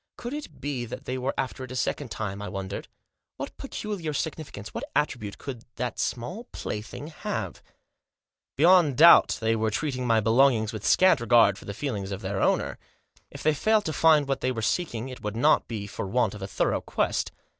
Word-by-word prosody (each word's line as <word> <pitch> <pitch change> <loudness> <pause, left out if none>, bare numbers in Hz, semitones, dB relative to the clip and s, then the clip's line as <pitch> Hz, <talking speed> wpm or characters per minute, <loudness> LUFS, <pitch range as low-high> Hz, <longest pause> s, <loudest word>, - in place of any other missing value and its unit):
Could 240 +2 -6
it 285 - -7
be 135 -3 -3
that 120 - -8
they 130 - -3
were 130 +2 -2
after 130 0 -3
it 130 - -8
a - - -5
second 130 +1 -2
time. 100 -3 -4
I 105 - -5
wondered. 95 -1 -5 0.5
What - - -6
peculiar 185 -8 -4
significance, 145 -9 -5
what - - -4
attribute, 120 -8 -1
could 125 -5 -7
that 120 -1 -3
small 180 - -3
plaything 125 - -6
have? 155 - -5 1.0
Beyond 165 -3 +5
doubt 170 +3 +8
they 115 0 +1
were 110 0 +1
treating 130 +2 -2
my 115 -1 +4
belongings 115 0 +3
with 110 -2 -4
scant 185 -7 +5
regard 115 -4 +5
for - - -13
the 100 - -6
feelings 105 -8 -3
of 95 +1 -4
their 95 0 -2
owner? - - +1 0.5
If - - -10
they 155 - +4
failed 215 +7 +2
to 155 - -2
find 155 -1 +4
what 135 - -1
they 130 - +1
were 115 -3 -4
seeking 120 -4 -1
it 130 - -9
would 105 0 -4
not 115 - +3
be 110 -3 -4
for 100 0 -5
want 115 0 +1
of 105 - -9
a 95 - -4
thorough - - 0
quest. - - -1
125 Hz, 200 wpm, -26 LUFS, 110-150 Hz, 1.0 s, doubt